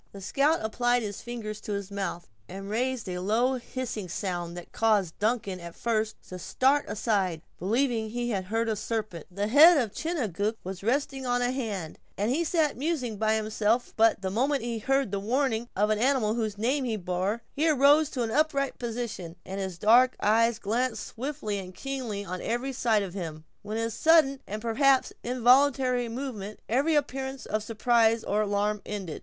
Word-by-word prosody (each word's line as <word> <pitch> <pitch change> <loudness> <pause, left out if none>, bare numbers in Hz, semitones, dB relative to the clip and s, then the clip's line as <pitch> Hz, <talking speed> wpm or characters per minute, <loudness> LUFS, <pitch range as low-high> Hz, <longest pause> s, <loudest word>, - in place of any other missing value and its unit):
The 200 - -9
scout 280 - +1
applied 240 +2 +1
his 205 -2 -5
fingers 215 -3 -6
to 210 - -4
his 200 0 -4
mouth, 195 -3 -4 0.2
and 195 +1 -7
raised 250 0 -1
a 180 -1 -3
low 235 +7 +1
hissing 240 -6 -5
sound, 175 -2 -3
that 175 - -9
caused 210 -7 +1
Duncan 210 -4 0
at 170 -1 -9
first 220 -2 -1
to 185 - -7
start 270 +10 +2
aside, 195 -7 -1 0.2
believing 230 +4 +1
that - - -7
he 240 0 -2
heard 215 +3 -1
a 220 - 0
serpent. 215 -6 -4
The 200 +3 -2
head 305 +8 +8
of 230 -7 0
Chingachgook 220 - -2
was 185 0 -6
resting 270 +4 -1
on 245 0 +1
a 245 - +1
hand, 210 -11 -4 0.2
as 210 +4 0
he 315 +6 +1
sat 315 -4 +1
musing 260 -6 -2
by 220 +1 +2
himself 220 +2 0
but 225 -3 +3
the 190 - -1
moment 265 +5 +1
he 235 -1 -3
had 215 - -15
heard 270 -5 +2
the 200 - -1
warning 240 +1 0
of 210 +2 +2
the 215 -1 +1
animal 250 -5 +2
whose 220 -3 -2
name 260 +6 0
he 230 -4 -1
bore, 185 +4 -2
he 315 +3 +2
arose 290 +1 +5
to 250 -5 -2
an 225 - -2
upright 280 -1 +1
position, 230 -8 -4
and 195 +1 -5
his 190 -3 -4
dark 240 +6 +5
eyes 230 +2 +3
glanced 225 +1 -1
swiftly 240 -5 -4
and 185 -1 -9
keenly 250 -7 -4
on 185 0 -5
every 245 +4 -2
side 225 -4 +2
of 185 -3 -6
him. 160 -5 -6 0.2
With 210 +1 -4
his 225 0 -1
sudden 310 -4 +4
and, 215 +2 -5
perhaps, 265 +3 +3
involuntary 250 0 +3
movement, 225 -5 -5
every 280 +7 +2
appearance 270 -2 -2
of 215 - -1
surprise 225 +1 +2
or 210 +1 0
alarm 205 0 0
ended. 195 -6 -5
225 Hz, 185 wpm, -28 LUFS, 205-255 Hz, 0.2 s, head